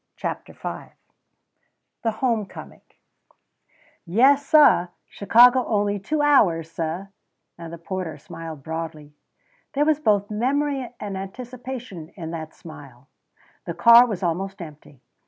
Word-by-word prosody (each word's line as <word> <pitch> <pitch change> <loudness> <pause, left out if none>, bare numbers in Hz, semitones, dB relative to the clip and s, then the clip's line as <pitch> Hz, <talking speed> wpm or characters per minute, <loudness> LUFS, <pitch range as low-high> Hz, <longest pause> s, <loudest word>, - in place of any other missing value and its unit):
CHAPTER - - -5
V - - -8 1.1
THE 230 - 0
HOME 225 -2 -1
COMING - - -12 1.2
"Yes, 270 +10 +3
suh, 290 - +5 0.2
Chicago 245 +5 +5
only 205 -1 0
two 295 +10 -1
hours, 170 - +3
suh," 165 +3 -4 0.5
and 165 -1 -9
the 170 - -7
porter 170 -2 -5
smiled 160 0 -9
broadly. 160 -2 -6 0.6
There 290 +2 +2
was 310 -1 +2
both 205 -7 +1
memory 265 +3 -1
and 205 -2 -5
anticipation 235 -2 -8
in 165 -3 -7
that 160 -1 -7
smile. 140 -5 -13 0.6
The - - -5
car 235 +1 +7
was 205 -5 -4
almost 190 +4 -2
empty. 150 -5 -12
195 Hz, 120 wpm, -23 LUFS, 165-245 Hz, 1.2 s, car